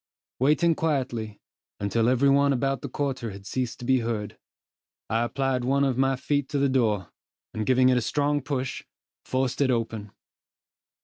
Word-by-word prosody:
Waiting 155 +6 +3
quietly, 125 -10 -2 0.4
until 110 +3 +1
every 130 +2 +3
one 140 0 +4
about 135 +1 -1
the 140 - -5
quarter 130 -4 -2
had 100 -1 -10
ceased 125 +3 -3
to 125 - -8
be 130 0 +3
heard, 115 -3 -3 0.8
I 115 +1 +2
applied 130 +1 -1
one 135 +3 +2
of 135 -2 +1
my 135 +1 +2
feet 140 +1 -1
to 150 - -1
the 140 0 +2
door, 110 -8 +1 0.4
and 110 -1 -3
giving 130 0 +5
it 125 - +4
a - - -3
strong 145 +4 0
push, 130 -2 -3 0.4
forced 130 +1 -1
it 135 - +3
open. 115 -3 -2
130 Hz, 170 wpm, -26 LUFS, 115-140 Hz, 0.8 s, giving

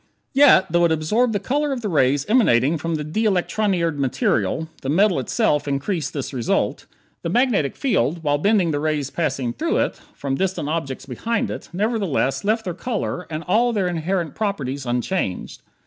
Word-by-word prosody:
Yet, 270 - +6
though 175 +1 +3
it 170 - +2
absorbed 210 +11 +1
the 205 - 0
color 285 +8 -1
of 260 -3 -3
the 215 - -2
rays 145 -5 +2
emanating 165 - +3
from 165 +2 -2
the 150 - -3
de 160 +9 -2
electronired 185 -4 +1
metal 135 +1 0
(the 135 - -4
metal 185 +1 +3
itself 150 - 0
increasing 140 +2 -2
this 140 -1 -4
result), 120 -3 -1 0.3
the 170 - -3
magnetic 220 - +1
field, 165 - 0
while 145 -1 +1
bending 195 -2 +2
the 145 - -1
rays 150 -3 -1
passing 135 -7 -1
through - - -1
it - - -1 0.2
from 140 -1 -3
distant 180 0 -1
objects 135 -5 -3
behind 225 - -2
it, - - -7
nevertheless 190 - 0
left 220 +2 +1
their 180 - -2
color 195 -2 -3
and 155 0 -4
all 235 +7 +2
their 195 -4 +1
inherent 170 -2 -2
properties 140 - -3
unchanged. 120 - -2
165 Hz, 175 wpm, -22 LUFS, 140-210 Hz, 0.3 s, Yet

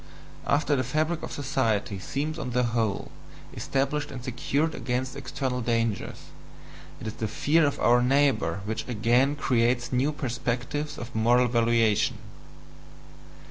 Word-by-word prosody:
After 145 0 +2
the 130 - +1
fabric 155 +6 0
of - - -6
society 115 -8 -1
seems 150 - -3
on - - -3
the 125 0 +2
whole 115 -4 -1 0.4
established 140 +2 -1
and 130 -4 -7
secured 140 +5 -1
against 125 +1 -2
external 135 -2 -3
dangers, 115 -2 -2 0.7
it - - -8
is 110 - -3
this 110 -2 -3
fear 150 +7 +3
of 145 - -2
our 120 +1 +4
neighbour 135 -5 +2
which 110 +1 -3
again 120 +4 +2
creates 120 -2 +1
new 130 +4 +2
perspectives 130 +2 -3
of 120 +2 -7
moral 120 +3 +4
valuation. 115 -2 +2
125 Hz, 135 wpm, -27 LUFS, 115-140 Hz, 0.7 s, our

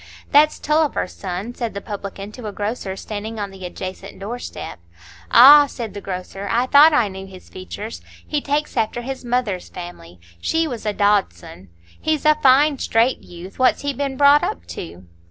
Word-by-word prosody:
"That's 300 +1 +5
Tulliver's 305 -9 0
son," 190 +5 -5
said 235 -4 -4
the - - -3
publican 200 0 -7
to 225 0 -8
a - - -4
grocer 205 -1 -4
standing 215 +2 -6
on 200 -1 -4
the 190 -1 -12
adjacent 190 +2 -8
door 225 +5 -6
step. - - -8 0.5
"Ah!" 290 - +9
said 230 -7 -7
the 205 - -7
grocer, 195 +1 -6
"I 240 +3 +2
thought 290 +4 +7
I 245 -8 +3
knew 190 0 -8
his 185 -1 -14
features. 205 +4 -8 0.2
He 295 -1 -2
takes 290 +2 -2
after 235 +1 -1
his 265 +1 -6
mother's 240 -7 -2
family; 135 - -10 0.2
she 325 0 0
was 235 -6 -6
a 210 - 0
Dodson. 195 - -1 0.3
He's 310 -2 -1
a 305 - +7
fine, 275 +2 +4
straight 230 +3 +1
youth; 175 +5 -12
what's 255 +2 +3
he 285 0 -1
been 275 0 -3
brought 285 +1 +6
up 85 - -3
to?" 85 +1 -8
220 Hz, 180 wpm, -21 LUFS, 190-270 Hz, 0.5 s, Ah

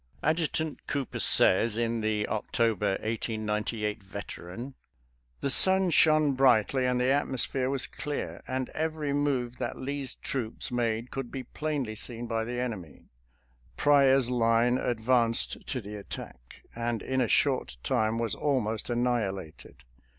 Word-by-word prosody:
Adjutant 160 -1 -1
Cooper 140 -2 -3
says, 110 +4 +5
in 115 -1 0
the 110 -1 0
October 110 -2 0
(1898) 110 -1 -2
Veteran: 100 +4 -8 0.3
" - - -41
The 140 - 0
sun 190 +3 +5
shone 155 -2 +5
brightly 130 0 +3
and 125 0 +1
the 125 +1 +2
atmosphere 130 -2 +1
was 135 -2 0
clear, 150 -2 -5
and 130 0 -2
every 155 -2 -2
move 135 -4 -1
that - - -3
Lee's 140 -1 -4
troops 120 -4 -3
made 115 -1 -1
could 135 -3 -4
be 135 -2 -5
plainly 140 -3 -3
seen 120 +2 -5
by 115 -1 -1
the 120 +1 -4
enemy. 105 -11 -6 0.7
Pryor's 135 -3 +4
line 120 +1 +3
advanced 115 0 +1
to 130 - -2
the 105 -1 -8
attack, 60 -10 -10
and 115 -2 -2
in 130 0 0
a 120 - +2
short 125 - +1
time 110 -3 +1
was 115 -2 -1
almost 120 -7 -1
annihilated. 100 - -2
120 Hz, 135 wpm, -28 LUFS, 110-135 Hz, 0.7 s, says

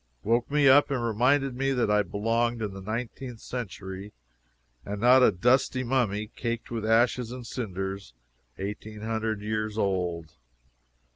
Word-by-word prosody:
woke 120 +2 +1
me 145 -1 +3
up 140 +2 +6
and 130 -4 -1
reminded 125 +4 +2
me 135 +1 0
that 120 -5 +1
I 105 0 +4
belonged 115 +4 0
in 100 -2 -3
the 95 - -8
nineteenth 115 +3 -5
century, 100 -4 -6 0.7
and 100 - -6
was - - -8
not 125 +2 +7
a - - +6
dusty 130 +6 +2
mummy, 115 -4 0
caked 115 -1 -4
with 115 -2 -3
ashes 115 +2 +2
and 125 -1 -7
cinders, 95 - -5 0.4
eighteen 105 +2 -6
hundred 110 -1 -2
years 110 0 -2
old. 90 -5 -1
115 Hz, 150 wpm, -27 LUFS, 105-125 Hz, 0.7 s, not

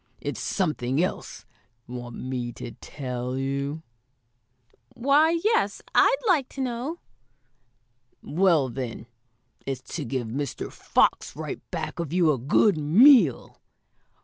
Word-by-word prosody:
It's - - -4
something 150 - 0
else. 185 - -5 0.4
Want 120 -1 -7
me 125 -2 -4
to 120 - -8
tell 125 -2 -5
you?" 140 +3 -3 1.1
"Why, 300 +6 +3
yes, 450 +2 +1
I'd - - +5
like 310 -9 +3
to 270 - -5
know." 260 +6 -3 1.2
"Well, 165 -5 +2
then, 120 -2 -6 0.6
it's 135 -2 -5
to - - -3
give 125 -1 -3
Mr. 140 +3 -4
Fox - - +1
right - - -6
back - - -5
of 165 -4 -3
you 170 -3 +3
a 135 - -1
good 155 - +3
meal." 180 - +5
150 Hz, 120 wpm, -25 LUFS, -, 1.2 s, I'd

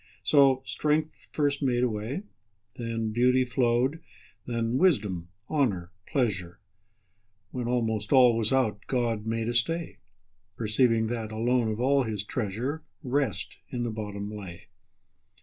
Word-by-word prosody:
So 135 -3 +5
strength 155 +1 -1
first 145 -1 +1
made 125 -3 +2
a - - +4
way, 115 - -4 0.5
Then 115 -2 -3
beauty 125 +3 +3
flow'd, 125 +4 +1 0.5
then 115 +1 0
wisdom, 105 - +2 0.2
honour, 100 - 0 0.2
pleasure; 95 - -1 0.9
When 125 -2 -3
almost 110 -4 -1
all 125 -3 +7
was 110 -2 +1
out, 125 -6 +2
God 115 -4 -1
made 115 0 -1
a 120 - -1
stay, 165 +8 0 0.6
Perceiving 115 +1 +2
that, 115 -2 -3
alone 120 +2 +1
of 110 0 -2
all 135 +3 +3
His 110 -5 -2
treasure, 120 +8 -3 0.2
Rest 130 -5 -1
in 120 -1 -3
the 120 - -2
bottom 105 -1 -5
lay. 95 -5 -9
120 Hz, 130 wpm, -28 LUFS, 110-130 Hz, 0.9 s, all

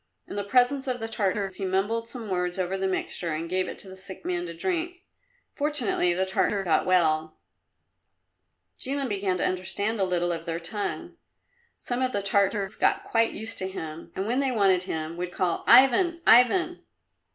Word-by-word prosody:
In - - -7
the 205 - -2
presence 255 +6 +2
of 250 -1 -2
the 225 - -4
Tartars 195 -3 -1
he 200 - -5
mumbled 205 +5 -1
some 235 -2 -7
words 180 -2 -1
over 185 0 -1
the 190 0 -1
mixture, 175 -3 -2
and 165 +2 -4
gave 185 +2 -1
it - - -7
to - - -6
the 190 - -10
sick 190 0 -10
man 175 -1 -2
to 170 - -7
drink. 355 - -3 0.5
Fortunately 285 -11 +1
the 185 +2 0
Tartar 195 +1 0
got 175 -1 +1
well. 160 -3 +2 1.4
Jilin 275 0 0
began 195 -3 -1
to - - 0
understand 200 +4 -1
a - - +2
little 175 -1 0
of 165 -1 -4
their 165 -1 -3
tongue. 205 +5 -4 0.6
Some 245 +1 -3
of 255 -1 0
the 200 - -1
Tartars 200 0 +1
got - - +1
quite 225 -1 +1
used 220 +2 -5
to 190 - -2
him, 165 -4 -7
and 190 - -2
when 245 +5 0
they 275 -2 +1
wanted 195 -5 +2
him 160 -1 -4
would 180 0 -4
call 180 -2 -1
"Ivan, 335 +8 +6
Ivan!" 345 +9 +5
195 Hz, 185 wpm, -26 LUFS, 180-240 Hz, 1.4 s, Ivan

